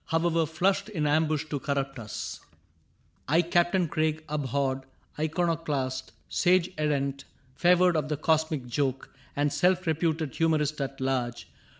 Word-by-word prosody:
However, 165 0 +1
flashed 185 +7 +1
in 160 -8 -2
ambush 155 0 +2
to 145 - -1
corrupt 135 -1 -2
us: 110 -2 -6
^^ - - -30 0.7
I, 165 +5 +4
Captain 175 +1 +2
Craig, 155 0 0
abhorred 140 -2 -1 0.4
iconoclast. 150 -5 -1 0.2
Sage 180 -1 +2
errant, 140 -2 -1 0.3
favored 180 +2 +4
of 150 -1 0
the 150 - -1
Cosmic 155 -2 +1
Joke, 130 +2 -2 0.2
And 145 0 +1
self 185 +1 +2
reputed 160 -2 0
humorist 155 -2 +1
at 135 0 -4
large. 120 -8 -2
155 Hz, 130 wpm, -28 LUFS, 140-165 Hz, 0.7 s, I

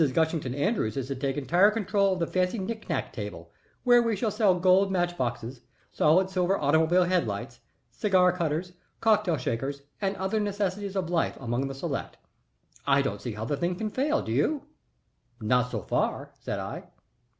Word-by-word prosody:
Gushington 160 -5 0
Andrews 145 - 0
is 130 -2 -2
to 135 - -2
take 135 +1 -2
entire 175 +8 +4
control 200 -2 +1
of 185 - -4
the 170 - +1
fancy 185 +5 0
knick 220 +3 -5
knack - - -2
table, - - -7 0.3
where 245 -1 +6
we 230 -2 +1
shall 215 +2 -1
sell 200 -4 +3
gold 190 +2 +4
match 175 -2 0
boxes, 120 -2 -3 0.3
solid 180 +5 +4
silver 190 0 +1
automobile 160 +5 +3
head 180 -5 +1
lights, 105 +4 -5 0.3
cigar 185 -3 +3
cutters, 170 0 -2 0.3
cocktail 210 -7 +3
shakers, 135 +3 -3 0.2
and 195 0 0
other 190 +3 -1
necessities 200 -1 -2
of 180 -3 -2
life 165 -2 0
among 125 +2 -1
the 135 - -6
select. 135 - -4 0.7
I 140 0 +4
don't 105 -6 -3
see 115 +1 -4
how 105 +1 -5
the 145 +4 -1
thing 175 +4 -1
can 215 +3 -3
fail, 290 +6 +1
do - - -5
you?" 270 - +1 0.8
"Not 125 +2 +2
so 110 -6 -4
far," - - -1
said - - -4
I. - - -6
175 Hz, 180 wpm, -27 LUFS, 135-195 Hz, 0.8 s, where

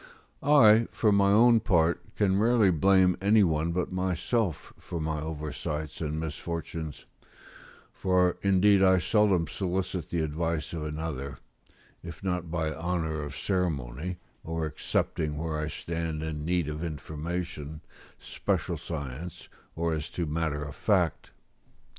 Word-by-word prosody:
] - - -36
I, 115 -6 +6
for 110 - +2
my 100 -1 +4
own 115 +2 +6
part, 85 -5 +1
can 95 -1 +2
rarely 110 -3 +4
blame 95 +2 +4
any 105 +2 +5
one 80 -1 +1
but 90 +1 -1
myself 95 - -1
for 85 - -5
my 80 -1 -2
oversights 75 -1 -4
and 75 -1 -2
misfortunes, 80 -1 -5 0.9
for 90 -1 +2
indeed 100 0 +4
I 95 -1 +6
seldom 95 -2 +3
solicit 90 -1 -3
the 85 -2 0
advice 80 0 -2
of 80 -2 -3
another, 75 -3 -4 0.6
if 85 +1 -9
not 90 -3 -2
by 80 -2 -1
honour 80 -1 -2
of 75 -1 -6
ceremony, 85 -1 -2 0.3
or 80 0 -2
excepting 75 0 -2
where 80 0 -2
I 75 - -2
stand 80 0 -4
in 75 -1 -4
need 85 -2 +1
of 75 +2 -4
information, 80 0 -5 0.4
special - - -2
science, 75 +1 -6 0.3
or 85 0 0
as 80 0 -3
to 85 - 0
matter 75 -1 -1
of 75 -1 -7
fact. - - +1
85 Hz, 135 wpm, -28 LUFS, 75-95 Hz, 0.9 s, I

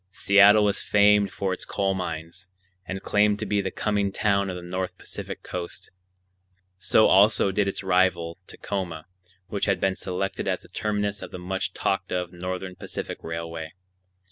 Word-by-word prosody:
Seattle 100 +2 +6
was 100 -1 +1
famed 105 0 +4
for 95 -1 -2
its - - -7
coal 95 -1 0
mines, 85 0 -5 0.4
and 95 +1 -5
claimed 105 0 +3
to - - -4
be 105 -1 +1
the 95 - -2
coming 100 0 0
town 100 -1 +1
of 90 - -4
the 90 - -7
North 90 +1 -4
Pacific - - -8
Coast. 90 -1 -7 0.8
So 100 +3 +4
also 100 0 +5
did 100 +1 +1
its 100 - -3
rival, 90 -2 +1
Tacoma, 90 -6 -5 0.4
which 100 +1 -2
had 100 -2 +1
been 95 0 +2
selected 95 0 -3
as - - 0
the - - -16
terminus 105 -1 -2
of - - -7
the - - -7
much 95 +1 -3
talked 95 -2 -1
of 90 -1 -2
Northern 90 +1 -5
Pacific - - -6
Railway. 80 -1 -5
95 Hz, 170 wpm, -25 LUFS, 90-100 Hz, 0.8 s, Seattle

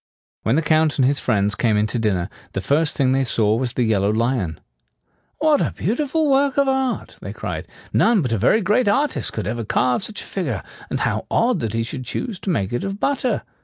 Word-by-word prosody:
When 115 - +1
the 165 - +2
Count 155 0 +2
and 130 - +4
his 140 +2 +2
friends 105 -4 +1
came 110 -1 +1
in 105 - +2
to 115 +3 -2
dinner, 95 -5 0 0.3
the - - -1
first 150 +6 +1
thing 130 -2 +3
they 135 0 +2
saw 110 -3 +2
was 120 +1 -1
the 125 - +1
yellow 105 -3 +2
lion. 110 - 0 0.8
"What 310 -2 +3
a - - 0
beautiful 295 - 0
work 275 0 +2
of 280 -1 +3
art!" 265 -1 -1
they - - -6
cried. - - -5 0.3
"None 225 -7 +4
but 125 - -2
a - - +1
very 170 - +3
great 210 +5 +2
artist 275 +8 +1
could - - -4
ever 115 +3 -2
carve 125 - +1
such 210 +2 -6
a - - -13
figure; 135 - -3 0.3
and - - -2
how - - -1
odd - - +2
that 115 -1 -3
he 115 - +1
should 130 +3 -5
choose 195 - -4
to 195 - -5
make 100 - -1
it 120 - -1
of 195 +1 -4
butter!" 265 -1 0
135 Hz, 225 wpm, -21 LUFS, -, 0.8 s, and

